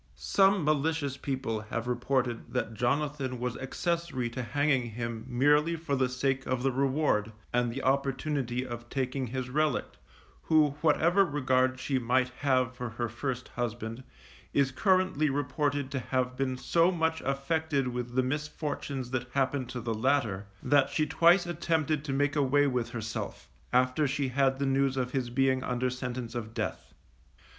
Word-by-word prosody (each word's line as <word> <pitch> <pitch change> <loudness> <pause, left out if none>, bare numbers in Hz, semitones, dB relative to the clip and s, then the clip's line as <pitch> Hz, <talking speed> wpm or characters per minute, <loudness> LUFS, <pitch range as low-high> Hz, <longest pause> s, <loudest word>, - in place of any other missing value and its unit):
Some 195 - +3
malicious 155 -2 +1
people 130 -6 -3
have 110 +2 -4
reported 125 -1 -1
that 120 -3 -1
Jonathan 130 +2 -1
was 125 0 -2
accessory 160 -3 -2
to 125 - -4
hanging 135 0 +1
him 115 0 -5
merely 150 +6 +3
for 160 -3 -2
the 130 -1 +1
sake 135 +1 0
of 130 -1 -1
the 135 - +2
reward, 135 -5 +1 0.2
and 120 -1 +2
the 135 +3 -5
opportunity 135 -1 0
of 120 -1 -7
taking 130 -1 -2
his 125 +1 -4
relict, 150 0 0 0.5
who, 155 -2 +5
whatever 170 +4 +4
regard 130 -5 +1
she 130 +1 0
might 125 +1 +2
have 130 -1 0
for 125 -1 -4
her 120 +1 -3
first 125 +2 -4
husband, 120 0 -4 0.5
is 140 -2 +3
currently 185 -1 +2
reported 145 0 -1
to 135 - -1
have 125 0 -1
been 130 -1 -1
so 165 +6 +3
much 160 -2 0
affected 140 0 0
with 125 0 -4
the 130 - +3
misfortunes 145 -2 -3
that 125 -2 -2
happened 135 -1 0
to 125 - -4
the 115 0 -2
latter, 110 -5 0 0.2
that 140 +1 +4
she 155 - +1
twice 170 +4 +4
attempted 160 -3 0
to 145 - -4
make 145 +2 +1
away 145 0 +3
with 125 -4 0
herself, 110 -2 -5 0.2
after 130 +4 +3
she 140 0 -1
had 135 +1 +2
the 140 - -1
news 135 0 +1
of 125 -1 -1
his 130 -3 -1
being 130 +1 +2
under 125 0 -1
sentence 125 -2 -5
of 115 -2 -5
death. - - -4
130 Hz, 160 wpm, -29 LUFS, 125-145 Hz, 0.5 s, who